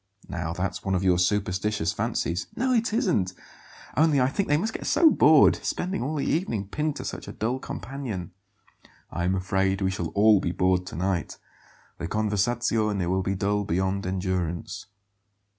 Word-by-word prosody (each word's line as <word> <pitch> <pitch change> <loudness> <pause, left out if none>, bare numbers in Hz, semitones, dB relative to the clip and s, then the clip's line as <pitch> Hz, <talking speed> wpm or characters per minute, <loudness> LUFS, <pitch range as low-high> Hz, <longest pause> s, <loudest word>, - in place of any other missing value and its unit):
"Now 85 -3 -3
that's 90 +2 -3
one 95 -1 0
of 90 - 0
your 90 -2 +3
superstitious 95 -1 0
fancies." 85 +1 -2
"No, 255 +1 +1
it 230 -2 +1
isn't; 175 - +1 0.6
only 155 -2 +4
I 125 0 +3
think 195 +8 -2
they 145 - +4
must 220 +7 -2
get - - -5
so 325 -3 +5
bored, 155 - +6
spending 190 +2 -3
all 150 +5 -2
the 145 - -1
evening 115 - -1
pinned 150 +6 -1
to - - -6
such - - -6
a - - -5
dull 120 +5 -2
companion." 120 -11 -6 0.8
"I 85 +2 -2
am 95 +2 +1
afraid 95 +1 0
we 95 -1 0
shall 90 -3 -3
all 105 0 +6
be 85 - -2
bored 90 0 +1
to - - -7
night. 90 +1 -2 0.6
The 85 - -3
conversazione 105 -1 0
will 95 +2 +1
be 95 +1 -1
dull 100 +2 0
beyond 95 0 -1
endurance." 90 -3 -3
100 Hz, 175 wpm, -26 LUFS, 90-130 Hz, 0.8 s, bored